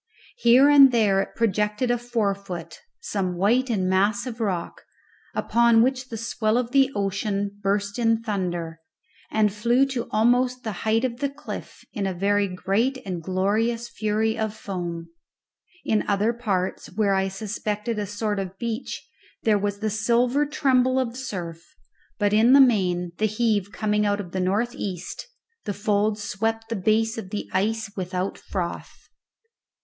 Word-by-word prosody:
Here 255 - +6
and 280 -2 +8
there 210 -5 +3
it - - -6
projected 210 +2 0
a 245 - +2
forefoot, 200 -8 -3 0.2
some 190 - -2
white 240 +8 +2
and 195 -5 0
massive 215 +6 +1
rock, 190 -6 -2 0.5
upon 235 -1 +4
which 255 0 -1
the 225 - -5
swell 220 0 0
of 245 -1 -1
the 270 -1 +4
ocean 200 0 -2
burst 200 +3 -1
in 225 -1 +2
thunder, 175 -6 -3 0.5
and 215 -2 +2
flew 240 +5 +3
to 250 -3 -3
almost 245 +3 +2
the 220 - -3 0.2
height 225 +3 +3
of 240 -1 -4
the 280 0 0
cliff 280 +1 -9
in 200 -2 -2
a 190 - -3
very 200 +2 +2
great 195 +8 0
and 180 -3 -4
glorious 215 +6 0
fury 220 +1 0
of 220 -1 -2
foam. 175 -5 -5 0.8
In 215 - +2
other 205 +3 +2
parts, 200 -6 -2
where 200 0 +1
I 190 0 +1
suspected 210 +2 -3
a 205 - -2
sort 205 0 -2
of 190 0 -5
beach, 235 +2 -4 0.4
there 215 -2 +3
was 205 0 -2
the 215 -1 0
silver 240 +6 +2
tremble 260 -3 +2
of 245 -2 -2
surf; 185 - -7 0.4
but 205 -1 +1
in 225 +4 +5
the 280 - +8
main, 180 -9 +3
the 215 - +3
heave 215 -2 0
coming 210 -1 0
out 205 0 0
of 180 -4 -6
the 185 - -2
north 205 +6 0
east, 190 - -6 0.4
the 205 - -3
folds 210 +1 0
swept 225 +2 -2
the 230 - -2
base 220 +3 +1
of 190 -4 -8
the 210 - -4
ice 220 +3 0
without 185 0 -3
froth. 175 -3 -4
215 Hz, 160 wpm, -24 LUFS, 195-235 Hz, 0.8 s, and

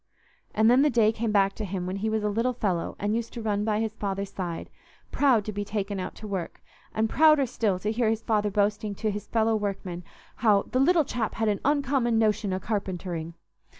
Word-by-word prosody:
And 220 +1 +4
then 250 +3 +6
the 300 - +4
day 225 -4 +4
came 225 0 -2
back 195 -1 +3
to 215 - -6
him 185 -2 -3
when 185 +2 -3
he 215 +3 -1
was 220 -1 -1
a - - +1
little 230 +5 0
fellow 190 -8 -2
and 205 +2 -1
used 230 0 -3
to 235 - -5
run 205 -1 0
by 210 -1 0
his 220 -1 -1
father's 200 -2 -3
side, 175 -3 -5 0.4
proud 255 -8 +3
to 215 - -3
be 205 0 -3
taken 205 -1 -3
out 185 - -5
to 215 - -9
work, 190 -4 -4 0.3
and 220 +1 0
prouder 305 +2 +5
still 220 -5 0
to 210 +4 -2
hear 225 0 +1
his 225 0 -1
father 210 -2 +1
boasting 205 +1 0
to 215 +1 -1
his 205 0 -6
fellow 225 -1 +2
workmen 195 -4 -3 0.3
how 210 -4 +4
"the 255 - -2
little 320 +3 +4
chap 240 -4 -3
had 225 -1 +1
an 205 - 0
uncommon 270 -5 +1
notion 215 -2 +1
o' 185 - -1
carpentering." 180 -5 -4
215 Hz, 220 wpm, -27 LUFS, 200-225 Hz, 0.4 s, then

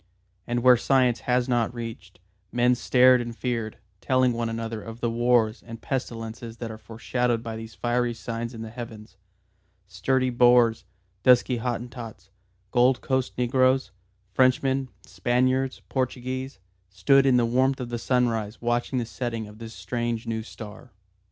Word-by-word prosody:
And 120 0 -1
where 125 -1 +7
science 125 -1 +2
has 125 0 +2
not 120 -1 0
reached, 110 -6 -8 0.3
men 120 +1 +3
stared 125 +1 +5
and 120 -1 -6
feared, 115 -4 -3 0.2
telling 130 -1 +2
one 115 0 -2
another 115 -1 -4
of 115 +2 -9
the 120 -1 -1
wars 120 -1 +2
and 115 -1 -10
pestilences 115 -2 -5
that 115 -1 -5
are 110 - -9
foreshadowed 115 +1 -2
by 115 -1 -5
these 110 -1 -9
fiery 120 0 0
signs 115 +1 -5
in 110 - -6
the 110 - -8
Heavens. 110 -4 -9 0.7
Sturdy 125 +8 0
Boers, 120 -2 +4 0.4
dusky 125 0 +4
Hottentots, 115 -4 -6 0.4
Gold 125 +1 +3
Coast 130 -1 -1
negroes, 130 -1 +2 0.4
Frenchmen, 130 +3 +2 0.2
Spaniards, 130 +2 0
Portuguese, 130 -1 -3 0.3
stood 135 +9 +3
in 130 -2 +5
the 120 - +3
warmth 130 +3 +1
of 125 -2 -5
the 120 -1 -3
sunrise 115 -4 0
watching 120 +2 -1
the 120 - 0
setting 115 -2 -4
of 105 +1 -14
this 115 -1 -9
strange 115 +4 -3
new 115 -1 -2
star. 110 +1 -11
120 Hz, 150 wpm, -25 LUFS, 115-125 Hz, 0.7 s, where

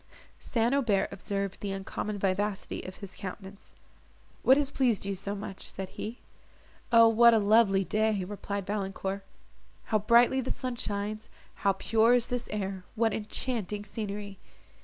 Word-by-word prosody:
St. 235 +1 0
Aubert 225 -9 +2
observed 200 0 -3
the 200 - -3
uncommon 195 +2 -4
vivacity 200 +1 -1
of 185 - -8
his 200 -2 -10
countenance: 195 0 -9 0.7
"What 265 - +6
has 285 -1 +1
pleased 245 -8 +1
you 200 - -1
so 200 +2 -3
much?" 195 -1 -7
said 190 -1 -6
he. 225 +3 -6 0.7
"O 230 -1 +8
what 230 +1 +6
a - - +5
lovely 205 -2 +4
day," 215 +1 +1
replied 200 0 -4
Valancourt, 195 -1 -3 0.6
"how 215 - +1
brightly 235 +5 +4
the 260 - -5
sun 255 -2 -3
shines, 210 -1 -4 0.2
how 195 - +1
pure 225 +4 +3
is 245 0 0
this 245 -1 -3
air, 195 -3 -3
what 225 -1 +2
enchanting 210 -2 -2
scenery!" 205 -1 -5
210 Hz, 150 wpm, -29 LUFS, 195-230 Hz, 0.7 s, O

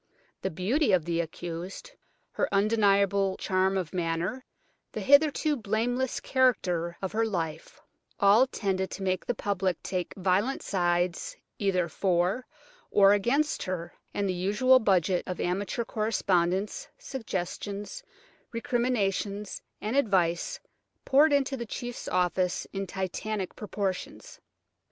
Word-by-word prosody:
The 190 - -1
beauty 210 - +1
of 175 -4 +3
the 170 -1 0
accused, 175 - -6 0.4
her - - -1
undeniable 200 -2 +3
charm 190 +1 +1
of 180 -2 -3
manner, 175 +7 -2 0.5
the - - -4
hitherto 295 +2 +4
blameless 240 +3 -1
character 180 -10 +1
of 190 - -2
her 225 +1 +1
life, 165 -8 -3 0.4
all 205 +6 +6
tended 190 -6 -1
to 195 - -6
make 185 -1 0
the 245 - 0
public 190 -4 -1
take 180 -2 -3
violent 195 +8 +1
sides 175 - 0 0.2
either 185 -4 +1
for 185 +7 0 0.4
or 200 -1 +6
against 265 +9 +1
her, 175 -2 -4 0.2
and 200 -1 -1
the 185 - 0
usual 210 +9 +4
budget 185 -4 +2
of 180 - -4
amateur 195 +6 -1
correspondence, 205 - 0
suggestions, 205 - -5 0.5
recriminations 215 -5 -1 0.2
and 215 +4 -2
advice 185 -10 +1 0.5
poured 290 +3 +5
into 275 -1 +2
the 235 -3 -5
chief's 240 +2 -6
office 180 0 0
in 195 0 -3
titanic 190 +1 -3
proportions. 200 -3 -4
195 Hz, 120 wpm, -28 LUFS, 180-235 Hz, 0.5 s, all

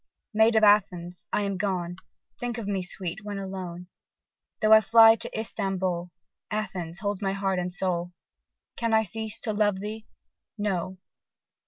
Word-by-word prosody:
Maid 220 +1 +4
of 220 - +4
Athens! 180 -4 +2
I - - +1
am 200 -1 -2
gone: 180 -3 -2 0.4
Think 245 -1 -3
of 230 - -4
me, 195 -2 -1
sweet! 185 +2 -4
when 205 -1 -5
alone. 185 -2 -6 0.7
Though 215 0 +5
I 220 - +9
fly 225 +1 +7
to - - -4
Istambol, 190 -5 -2 0.4
Athens 185 -6 -4
holds 205 -1 -2
my 195 -1 0
heart 195 -1 0
and 180 0 -2
soul: 180 -1 -1 0.6
Can 230 -1 +1
I 220 - +4
cease 220 +1 -4
to 220 - -2
love 205 -2 +1
thee? 215 +2 -6 0.5
No! 190 -3 -2
195 Hz, 155 wpm, -27 LUFS, 180-215 Hz, 0.7 s, I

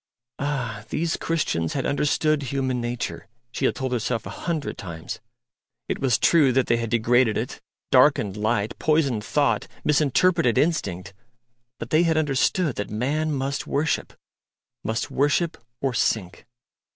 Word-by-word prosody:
Ah! 125 -7 -2
these 165 0 -1
Christians 115 - -1
had 135 - -2
understood 150 +1 +1
human 130 -2 -1
nature, 120 -3 -4 0.2
she 135 - -2
had - - +2
told 130 -1 -3
herself 120 -1 -1
a - - -6
hundred 160 -4 -3
times: 85 -4 -7 0.7
it - - -2
was 125 -6 +2
true 150 -1 +4
that 130 0 +3
they 120 - +2
had 115 -1 -3
degraded 115 0 +3
it, - - -4 0.3
darkened 100 -2 +4
light, 105 0 -1
poisoned 140 -8 +1
thought, 145 +5 +1 0.2
misinterpreted 150 -1 +3
instinct; 100 - 0 0.6
but - - -7
they 155 - +5
had 165 -2 +2
understood 150 +1 +1
that 105 - -3
man 145 +9 -1
must 135 -1 -2
worship 150 +3 -1 0.7
must 110 +2 -2
worship 145 +4 +1 0.3
or 135 -2 0
sink. 95 -7 -1
130 Hz, 140 wpm, -24 LUFS, 115-150 Hz, 0.7 s, they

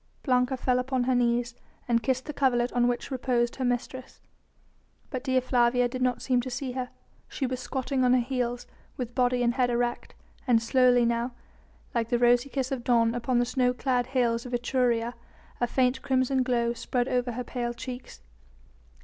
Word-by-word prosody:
Blanca 255 -1 +2
fell 250 0 +1
upon 255 0 -1
her 255 +1 +1
knees 240 -1 +1 0.3
and 235 -1 +2
kissed 260 +2 -1
the 300 - -5
coverlet 250 -3 +1
on 245 0 +3
which 245 +3 -2
reposed 245 -2 0
her 265 - -2
mistress; 250 +1 -3 0.9
but 255 -3 -4
Dea 260 -2 +2
Flavia 245 -1 +2
did 255 +1 -6
not 250 -1 0
seem 250 -2 +2
to 255 - -6
see 255 +1 -4
her. 250 0 -4 0.4
She 275 - -3
was 255 0 -3
squatting 260 +1 -2
on 250 0 +4
her - - +4
heels, 245 -1 -2 0.3
with 245 -2 -4
body 250 -1 +2
and 240 0 +2
head 250 -1 +1
erect, 240 0 -2 0.3
and 240 -2 +5
slowly 245 +1 +4
now, 235 +1 -1 0.6
like 230 -1 -1
the 240 - +2
rosy 245 +2 +3
kiss 265 -1 -2
of 260 -3 -3
dawn 230 -2 +3
upon 245 +1 0
the 245 - +3
snow 250 0 +1
clad 250 -1 0
hills 240 -3 +1
of 250 -1 -3
Etruria, 240 -1 0 0.5
a 240 - +1
faint 250 +1 +1
crimson 260 0 +1
glow 240 -2 +1
spread 245 +1 -2
over 245 -1 0
her 250 +2 -4
pale 240 -1 -3
cheeks. 250 - -8
245 Hz, 185 wpm, -27 LUFS, 240-255 Hz, 0.9 s, and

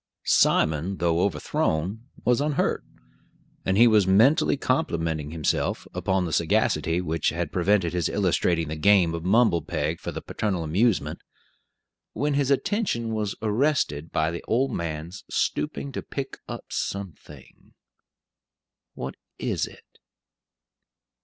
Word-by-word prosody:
Simon, 80 +5 +3
though 85 -1 +1
overthrown, 90 - -1 0.2
was 125 +2 +3
unhurt; 150 -1 0 0.8
and 95 +1 +1
he 120 - +8
was 105 -5 +4
mentally 135 - +4
complimenting 80 - -1
himself 80 -2 -1
upon 95 -1 0
the 80 - -4
sagacity 85 +3 +1
which 80 -2 0
had 85 0 -3
prevented 90 -1 +2
his 90 -3 0
illustrating 85 -4 +1
the 80 - -4
game 90 0 +4
of 85 -1 -4
mumble 100 -2 +3
peg 80 +3 -2
for - - -5
the - - -5
paternal 95 -6 -2
amusement, 95 +7 +1 0.9
when 145 +1 0
his 140 -1 +1
attention 140 - 0
was 105 -2 -2
arrested 105 - 0
by 80 +1 +1
the 85 - -6
old 130 +4 +1
man's 85 +2 -5
stooping 70 0 -1
to - - -4
pick - - -6
up - - -7
something 95 -7 -6 1.2
what - - -5 0.2
is - - -1
it? - - -18
95 Hz, 125 wpm, -25 LUFS, 80-115 Hz, 1.2 s, he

